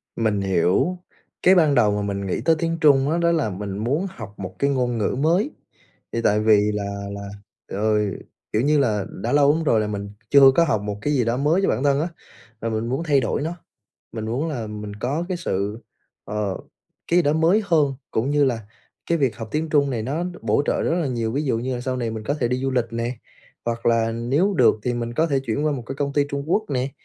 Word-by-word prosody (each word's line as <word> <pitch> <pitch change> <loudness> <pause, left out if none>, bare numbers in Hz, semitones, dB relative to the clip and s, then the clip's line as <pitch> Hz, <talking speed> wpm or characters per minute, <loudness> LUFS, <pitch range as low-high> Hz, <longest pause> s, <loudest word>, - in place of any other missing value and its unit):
Mình 110 -3 0
hiểu. 95 - +1 0.5
Cái 190 +1 +7
ban 155 -5 +4
đầu 105 -5 +4
mà 105 0 -1
mình 100 -1 -3
nghĩ - - -2
tới 165 0 +5
tiếng 165 0 -1
Trung 140 -2 +5
á, 165 - +1
đó 170 0 +2
là 155 -10 +1
mình 100 +1 -5
muốn 140 - 0
học 105 - -9
một 95 -1 -6
cái 140 - +2
ngôn 125 -3 0
ngữ 105 +3 0
mới. 175 - +2 0.6
Thì 115 - -1
tại 105 +1 +3
vì 105 -1 +4
là 100 -1 -4
là 100 0 -6 0.4
ờ, 105 +2 +1 0.6
kiểu 110 - +2
như 150 +2 +3
là 105 -7 +1
đã 115 +8 -4
lâu 145 0 +5
lắm 165 - -1
rồi 115 -7 +3
là 105 - 0
mình 100 -1 -4 0.2
chưa 140 -1 +8
có 170 - +5
học 110 -11 +1
một 105 0 -4
cái 150 - 0
gì 125 -5 +2
đó 115 +2 0
mới 155 +7 +2
cho - - +2
bản 130 - 0
thân 140 0 +3
á, 165 - -1 0.5
là 115 - -1
mình 110 +1 -2
muốn 135 +6 -1
thay 145 -4 +3
đổi 115 - -1
nó. 165 +4 -3 0.6
Mình 110 -2 -5
muốn 125 +9 -2
là 125 -8 -4
mình 105 -1 -7
có 140 +10 -2
cái 185 - -1
sự, 105 - -2 0.4
ờ, 105 -2 -2 0.5
cái 175 +1 +5
đó 145 -2 +2
mới 165 +7 +3
hơn, 150 -6 +2 0.2
cũng 125 +6 0
như 145 0 +3
là 120 -4 0 0.5
cái 170 - +3
việc 130 -7 +1
học 115 - -6
tiếng 155 +1 -1
Trung 140 -2 +3
này 115 -4 -2
nó 150 +9 -2 0.2
bổ 115 +5 +2
trợ - - +1
rất - - +1
là 160 - 0
nhiều, 115 -3 -2
ví 140 +4 0
dụ 125 -5 0
như 125 +2 -2
là 120 - -4
sau 130 0 -2
này 120 -2 -2
mình 110 -1 -6
có 145 - 0
thể 125 -6 -1
đi 125 - 0
du 135 - 0
lịch 125 -3 +1
nè, 115 +2 -2 0.5
hoặc 115 0 -3
là 115 -1 +2
nếu 140 - +1
được 130 -8 +5
thì 125 +1 -1
mình 120 0 -4
có 160 - +2
thể 140 -4 +1
chuyển 135 +3 -2
qua 150 - +2
một 135 -4 -4
cái 135 - -5
công 140 0 -2
ty 145 0 +2
Trung 140 0 -3
Quốc 215 +4 +2
nè. 130 0 -1
125 Hz, 250 wpm, -23 LUFS, 110-150 Hz, 0.6 s, chưa